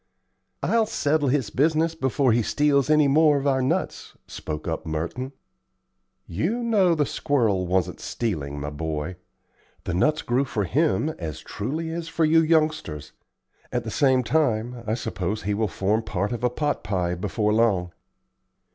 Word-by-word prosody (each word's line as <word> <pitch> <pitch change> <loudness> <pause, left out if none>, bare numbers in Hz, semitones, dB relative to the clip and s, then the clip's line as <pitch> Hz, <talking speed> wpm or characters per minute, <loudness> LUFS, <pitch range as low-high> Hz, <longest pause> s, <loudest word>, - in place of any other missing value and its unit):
"I'll 230 -1 +2
settle 150 -6 +1
his 130 -6 0
business 160 +5 +2
before 135 -4 +1
he 120 +2 +3
steals 145 +3 +2
many 150 -1 +5
more 150 +1 +4
of 140 - -3
our 135 -2 +2
nuts," 130 - -2
spoke 75 0 -6
up 80 -1 -2
Merton. 85 - -4 0.9
"You 185 - -2
know 200 -7 +3
the 150 -2 +1
squirrel 115 - 0
wasn't 90 -1 0
stealing, 75 -11 -3
my 75 +1 -4
boy. 80 +3 -4 0.7
The 90 - -3
nuts 155 - +1
grew 125 +3 +1
for 110 -5 -2
him 150 - +1
as 80 -3 -5
truly 155 +10 -4
as 165 0 -4
for 165 0 +1
you 160 +1 +5
youngsters. 155 - 0 0.6
At 120 -1 -1
the 110 - -5
same 130 -1 +3
time 120 -3 0
I 110 - +1
suppose 95 -2 -3
he 105 +2 0
will 110 +1 0
form 100 +4 0
part 105 -1 -2
of 120 0 -4
a 125 - +3
pot 145 +4 -2
pie 90 -3 -1
before 105 +4 -1
long." 100 -6 +2
120 Hz, 160 wpm, -24 LUFS, 95-150 Hz, 0.9 s, many